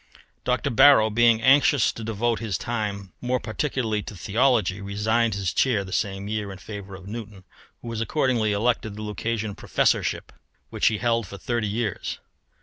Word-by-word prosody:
Dr. - - 0
Barrow, 130 -3 +6
being 115 0 +4
anxious 135 -1 +5
to 115 - -8
devote 115 +1 -1
his 105 -6 -2
time 105 -5 -4
more 125 +1 0
particularly 115 -2 -2
to 105 - -9
theology, 105 +1 +1
resigned 110 +3 0
his 95 -3 -2
chair 115 -7 +2
the 95 -1 -8
same 95 0 -2
year 105 -1 -3
in 95 - -8
favour 100 -1 -8
of 95 0 -12
Newton, 105 -2 -8 0.4
who - - -8
was 115 -1 -3
accordingly 120 -4 +1
elected 110 0 0
to - - -11
the 105 - -7
Lucasian 110 0 -3
Professorship, - - 0 0.4
which - - +1
he 110 - +2
held 115 -2 0
for 100 - -9
thirty 115 0 -2
years. 105 -1 -3
110 Hz, 170 wpm, -24 LUFS, 100-120 Hz, 0.4 s, Barrow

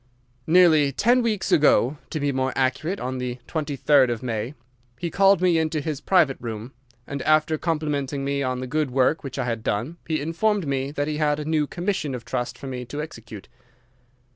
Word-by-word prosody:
"Nearly 160 -4 +5
ten 240 - +3
weeks 220 -4 -1
ago—to 145 +1 +2
be 145 0 0
more 130 0 -1
accurate, 135 +8 0
on 130 +1 -3
the 125 -1 -3
23rd 145 -3 +2
of 120 0 -3
May—he 120 +4 -6
called 195 0 +4
me 175 -3 +4
into 160 -1 0
his 150 -1 -4
private 165 -8 +3
room, 115 +1 -6 0.3
and, 140 +1 -5
after 155 +1 +3
complimenting 145 -4 -2
me 140 0 -1
on 130 -1 -2
the - - -3
good 150 +2 -1
work 135 +5 +1
which 135 -2 -6
I - - -1
had 115 -2 -2
done, 120 +13 -2
he 160 -1 0
informed 180 +6 0
me 135 -1 -1
that 145 0 -2
he 150 -1 -2
had 150 -1 +1
a 150 - -4
new 155 -1 +1
commission 175 -6 -2
of 120 -2 -8
trust 125 0 -3
for - - -10
me 130 -2 -5
to 145 +5 -6
execute. 115 -9 -8
145 Hz, 190 wpm, -24 LUFS, 130-160 Hz, 0.3 s, Nearly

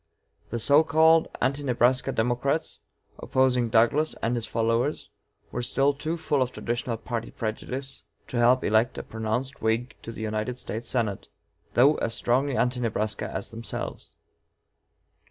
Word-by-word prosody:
The 120 - -2
so 145 +7 +5
called 160 +1 +5 0.2
Anti 135 +3 +1
Nebraska 125 -1 +2
Democrats, 125 +7 -1 0.4
opposing 125 -2 +2
Douglas 120 +8 +3
and 115 - +1
his 115 -2 -1
followers, 115 +6 0 0.4
were 120 - -3
still 135 +4 +2
too 155 +4 -3
full 150 -4 0
of 130 -1 +1
traditional 120 -1 -3
party 115 0 -4
prejudice 130 +5 -5 0.3
to 125 - -3
help 125 +2 +4
elect 110 +4 +2
a - - -4
pronounced 110 +5 -3
Whig 115 +3 0
to 115 - -7
the 110 - -8
United 110 +3 -2
States 115 -1 -5
Senate, 110 -6 -1 0.5
though 140 +5 +5
as 115 - -1
strongly 130 +2 +1
"Anti 125 0 +1
Nebraska" 110 -2 -2
as 95 - -4
themselves. 115 0 -6
120 Hz, 145 wpm, -26 LUFS, 115-135 Hz, 0.5 s, so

